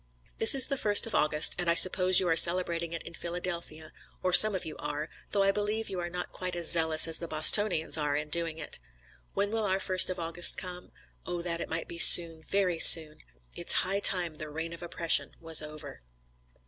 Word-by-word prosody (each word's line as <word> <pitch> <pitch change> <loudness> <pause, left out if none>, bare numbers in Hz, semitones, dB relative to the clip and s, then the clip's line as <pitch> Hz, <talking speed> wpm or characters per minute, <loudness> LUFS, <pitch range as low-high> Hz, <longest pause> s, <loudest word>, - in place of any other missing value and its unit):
"This 225 - +3
is 265 -2 +3
the 275 -1 -5
first 205 -1 -1
of 230 - -11
August, 150 0 0
and 175 -1 -4
I 170 - -1
suppose 185 +1 +5
you 185 - -4
are 165 - -2
celebrating 170 -1 +2
it 165 - -10
in 165 - -14
Philadelphia, 170 -2 -8 0.3
or 185 -1 -4
some 215 +2 +7
of 185 - -8
you 155 - -11
are, 150 +1 -8 0.2
though 200 - -3
I 195 - -1
believe 210 +2 -6
you 185 - -8
are 175 0 -8
not 180 0 -9
quite 180 -1 -9
as 170 -2 +1
zealous 160 -1 +2
as 165 0 -1
the 170 - -10
Bostonians 160 +1 +1
are 145 -1 -5
in 150 +1 -7
doing 165 0 -6
it. 155 - -9 0.6
When 200 +1 -5
will 225 0 -5
our 190 -1 -4
first 185 -1 +1
of 185 - -8
August 170 +1 -1
come? 180 -1 -11 0.4
oh, 175 -1 -8
that 170 -1 -7
it - - -10
might 165 0 -7
be 170 - -11
soon, 165 -1 +6
very 180 -1 -5
soon!... 155 -2 +6 0.4
It's - - +1
high 195 +2 -4
time 180 -5 +2
the 155 0 -12
'reign 160 +2 -10
of 170 - -15
oppression 170 -1 -4
was 165 -1 +1
over.'" 150 - -13
170 Hz, 215 wpm, -25 LUFS, 160-185 Hz, 0.6 s, some